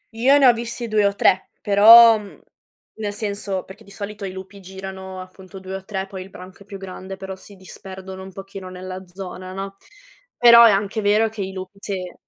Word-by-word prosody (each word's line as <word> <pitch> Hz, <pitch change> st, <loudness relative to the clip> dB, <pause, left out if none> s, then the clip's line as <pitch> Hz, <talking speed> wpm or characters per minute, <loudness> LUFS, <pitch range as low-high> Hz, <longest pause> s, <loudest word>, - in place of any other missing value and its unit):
Io 265 Hz, +5 st, +4 dB
ne 275 Hz, -, +4 dB
ho 245 Hz, -, +7 dB
visti 235 Hz, +1 st, -5 dB
2 210 Hz, -2 st, +2 dB
o 200 Hz, -, -2 dB
3, 185 Hz, -1 st, +2 dB
però 225 Hz, +2 st, +8 dB
mhmm, 205 Hz, -1 st, -13 dB, 0.6 s
nel 205 Hz, -1 st, -3 dB
senso, 200 Hz, -3 st, -3 dB
perché 205 Hz, +4 st, -14 dB
di 200 Hz, -, -19 dB
solito 200 Hz, +1 st, -7 dB
i 185 Hz, -, -5 dB
lupi 190 Hz, +1 st, -10 dB
girano 190 Hz, 0 st, -9 dB
appunto 185 Hz, +1 st, -12 dB
2 190 Hz, 0 st, -9 dB
o 190 Hz, 0 st, -6 dB
3, 190 Hz, -2 st, -4 dB
poi 190 Hz, -1 st, -9 dB
il 190 Hz, -, -11 dB
branco 185 Hz, +1 st, -13 dB
è -, -, -14 dB
più 200 Hz, -1 st, -8 dB
grande, 190 Hz, 0 st, -9 dB
però 190 Hz, 0 st, -7 dB
si 200 Hz, +1 st, -15 dB
disperdono 190 Hz, 0 st, -10 dB
un 190 Hz, 0 st, -10 dB
pochino 195 Hz, 0 st, -9 dB
nella 185 Hz, +1 st, -8 dB
zona, 185 Hz, 0 st, -9 dB
no; 195 Hz, 0 st, -6 dB, 0.6 s
però 235 Hz, -1 st, +8 dB
è -, -, +7 dB
anche 200 Hz, +2 st, -1 dB
vero 210 Hz, +2 st, +2 dB
che 215 Hz, -2 st, -7 dB
i 190 Hz, 0 st, -4 dB
lupi 190 Hz, +1 st, -9 dB
sì. 185 Hz, -3 st, -5 dB
195 Hz, 210 wpm, -21 LUFS, 190-210 Hz, 0.6 s, però